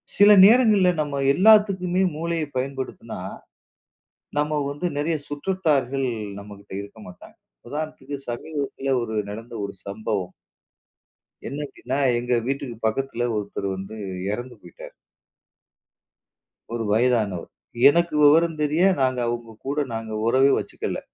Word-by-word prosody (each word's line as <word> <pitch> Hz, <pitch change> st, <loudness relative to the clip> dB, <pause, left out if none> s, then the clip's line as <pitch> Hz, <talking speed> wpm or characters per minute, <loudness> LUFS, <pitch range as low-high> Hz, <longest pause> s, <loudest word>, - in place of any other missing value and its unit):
சில 205 Hz, +1 st, +7 dB
நேரங்கள்ல 215 Hz, -4 st, +5 dB
நம்ம 145 Hz, -2 st, -3 dB
எல்லாத்துக்குமே 190 Hz, -2 st, +4 dB
மூளையை 165 Hz, 0 st, -2 dB
பயன்படுத்தினா 130 Hz, +1 st, -5 dB, 1.2 s
நாம 150 Hz, 0 st, +1 dB
வந்து 145 Hz, +5 st, -5 dB
நிறைய 160 Hz, +3 st, 0 dB
சுற்றத்தார்கள் 145 Hz, -5 st, 0 dB, 0.3 s
நம்மகிட்ட 100 Hz, -1 st, -12 dB
இருக்க 100 Hz, +2 st, -12 dB
மாட்டாங்க. 90 Hz, -, -14 dB, 0.3 s
உதாரணத்துக்கு 145 Hz, -2 st, -5 dB
சமீபத்துல 135 Hz, +1 st, -3 dB
ஒரு 110 Hz, -2 st, -4 dB, 0.2 s
நடந்த 115 Hz, +3 st, -9 dB
ஒரு 100 Hz, -, -7 dB
சம்பவம். 100 Hz, -3 st, -3 dB, 1.2 s
என்ன 140 Hz, -, -5 dB
அப்படின்னா 130 Hz, 0 st, -5 dB, 0.2 s
எங்க 125 Hz, +1 st, -1 dB
வீட்டுக்குப் 125 Hz, -5 st, -4 dB
பக்கத்துல 120 Hz, +1 st, -1 dB
ஒருத்தர் 100 Hz, -1 st, -4 dB
வந்து 95 Hz, +3 st, -8 dB, 0.3 s
இறந்து 120 Hz, +3 st, -5 dB
போயிட்டாரு. 90 Hz, -, -12 dB, 1.8 s
ஒரு 115 Hz, -, -2 dB
வயதானவர். 110 Hz, -6 st, +1 dB, 0.4 s
எனக்கு 170 Hz, +1 st, +1 dB
விவரம் 160 Hz, +2 st, +5 dB
தெரிய 150 Hz, +4 st, +2 dB, 0.2 s
நாங்க 130 Hz, -1 st, +1 dB
அவங்க 115 Hz, -2 st, -5 dB
கூட 145 Hz, +2 st, -1 dB
நாங்க 115 Hz, -1 st, -5 dB, 0.2 s
உறவே 135 Hz, +3 st, +4 dB
வச்சுக்கல. -, -, -4 dB
135 Hz, 110 wpm, -23 LUFS, 115-155 Hz, 1.8 s, சில